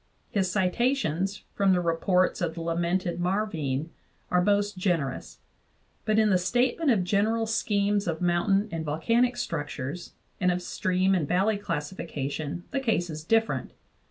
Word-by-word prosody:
His 190 -3 +1
citations 195 - 0
from 195 -1 +3
the 180 - +3
reports 175 +3 +1
of 165 -2 -1
the 170 - -5
lamented 170 +2 -1
Marvine 170 -7 -1 0.4
are 180 - +4
most 205 +1 +1
generous; 170 -8 -2 0.7
but 215 0 +2
in 215 -1 +4
the 185 - +4
statement 245 - +1
of 210 -7 +3
general 215 +5 +1
schemes 205 -2 +1
of 165 -2 -1
mountain 180 +4 +2
and 165 -1 -3
volcanic 230 +12 +1
structures 150 0 -4 0.3
and 180 -1 +3
of 180 0 -2
stream 185 +2 +1
and 170 -6 +1
valley 195 +6 +2
classification 155 -3 -4
the 275 - 0
case 215 -10 0
is 155 0 -6
different. 225 +6 +1
185 Hz, 145 wpm, -27 LUFS, 165-205 Hz, 0.7 s, are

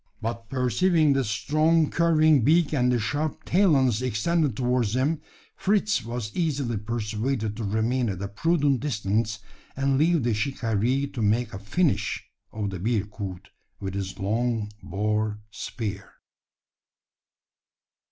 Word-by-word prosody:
But 115 0 -5
perceiving 150 +5 +3
the 135 0 +1
strong 155 +9 +2
curving 155 -4 +4
beak 160 +5 +3
and 125 -3 +2
the 125 - +2
sharp 145 +7 -2
talons 140 - +3
extended 130 +3 0
towards 125 -3 +1
him, 145 +5 +1 0.3
Fritz 205 - +1
was 115 -2 -5
easily 140 -9 0
persuaded 110 +1 -2
to 115 - -4
remain 110 +4 0
at 95 -3 -4
a - - -2
prudent 145 +4 +1
distance, 110 -4 -1 0.4
and 135 0 +1
leave 165 -2 +3
the 120 -1 +1
shikaree 115 +3 0
to 125 - -3
make 110 +2 +1
a 95 - -5
finish 150 - 0 0.2
of 105 -2 -3
the 95 - -5
bearcoot 100 -3 -3 0.3
with 95 -1 -4
his 95 -1 -4
long 110 +1 -1
boar 105 +3 -1
spear. 105 -3 -5
120 Hz, 130 wpm, -26 LUFS, 105-145 Hz, 0.4 s, curving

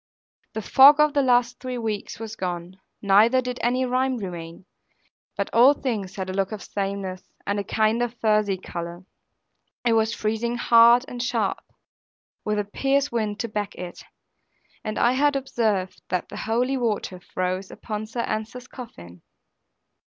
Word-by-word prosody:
The 220 - -4
fog 280 +6 +7
of 300 -1 +4
the 285 - +3
last 245 -2 +2
three 255 -1 -4
weeks 220 -4 -4
was 220 -1 -6
gone, 180 0 -5 0.2
neither 210 +6 +5
did 250 -1 -4
any 250 +2 +1
rime 255 +1 0
remain; 175 -4 -7 0.7
but - - -1
all 255 +5 +7
things 210 -9 -3
had 190 -2 -4
a 185 - -4
look 195 +1 -1
of 215 -2 -6
sameness, 195 -2 -4 0.2
and 200 0 -1
a - - -2
kind 220 +3 +1
of 240 -1 -2
furzy 210 -3 +2
colour. 170 0 -7 0.8
It 235 - +4
was 220 0 +2
freezing 225 +2 -1
hard 235 +1 +6
and 245 -4 -6
sharp, 230 -5 0 0.8
with 210 0 -1
a 205 - +1
piercing 275 +7 0
wind 215 -2 -1
to 230 - -2
back 210 -2 -4
it; 180 -1 -8 0.8
and 215 - -4
I 240 - +4
had 285 +2 +2
observed 220 -8 -1
that 180 -1 -2
the - - -8
holy 245 +4 0
water 215 -6 -2
froze 185 +1 -3
upon 215 0 -6
Sir 235 +2 -3
Ensor's 220 +3 -4
coffin. 90 - -11
220 Hz, 160 wpm, -24 LUFS, 195-245 Hz, 0.8 s, fog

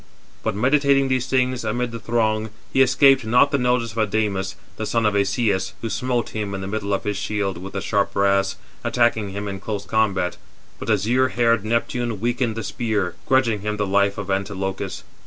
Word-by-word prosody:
But - - -1
meditating 135 +3 +3
these 130 0 0
things 130 -2 +1
amid 120 +2 -1
the 115 - -6
throng, 110 -1 0 0.2
he 135 - +4
escaped 135 +1 +5
not 120 +5 +4
the 140 - +1
notice 125 -2 +1
of 115 - -5
Adamas, 100 -3 0 0.2
the 110 - -3
son 115 -1 +1
of 105 - +3
Asias, 100 -2 +1
who 115 - -3
smote 125 -2 -1
him 105 -2 -4
in 95 - -4
the 95 - -4
middle 100 0 -3
of 100 - 0
his 105 -1 -2
shield 100 -5 -2
with 95 +2 -8
the 100 - -3
sharp 100 0 0
brass, 100 0 +2 0.3
attacking 110 -3 +1
him 100 +1 -5
in 100 -1 -5
close 100 0 -4
combat; 100 -5 0 0.4
but - - -6
azure 115 +5 +2
haired 115 -4 +2
Neptune 115 0 -1
weakened 120 0 0
the 115 - -4
spear, 105 -8 -1
grudging 120 -5 +3
435 105 +2 -4
him - - -5
the 105 - 0
life 100 0 +3
[of 100 -1 -4
Antilochus]. 95 0 -3
110 Hz, 195 wpm, -22 LUFS, 100-120 Hz, 0.4 s, escaped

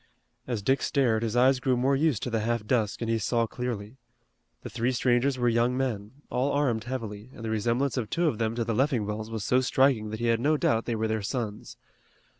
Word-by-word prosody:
As 115 -5 -3
Dick 135 +6 +2
stared 120 -6 +1
his 115 0 -2
eyes 130 +2 +4
grew 130 -1 +1
more 135 +3 +2
used 140 -6 +1
to 125 - -3
the 115 - +1
half 115 0 -1
dusk 110 -2 0
and - - -3
he 115 - +1
saw 115 +2 +1
clearly. 115 -1 -5 0.7
The - - -6
three 120 +3 0
strangers 125 +2 +2
were 120 -1 +1
young 120 +2 +2
men, 130 +1 -3
all 130 +3 +1
armed 125 -6 0
heavily, 115 -3 -5
and 115 - -8
the 110 - -2
resemblance 120 +6 0
of 115 -4 -2
two 170 0 +1
of 115 -8 -1
them 115 0 0
to 120 - 0
the 115 0 -2
Leffingwells 110 -5 0
was 110 -2 -4
so 125 +3 +3
striking 130 -3 +2
that 110 0 -5
he 120 - -1
had 115 -1 +2
no 150 +5 +2
doubt 115 -5 +1
they 120 - -1
were 110 0 -1
their 110 0 -1
sons. 105 -1 -4
120 Hz, 230 wpm, -27 LUFS, 110-130 Hz, 0.7 s, eyes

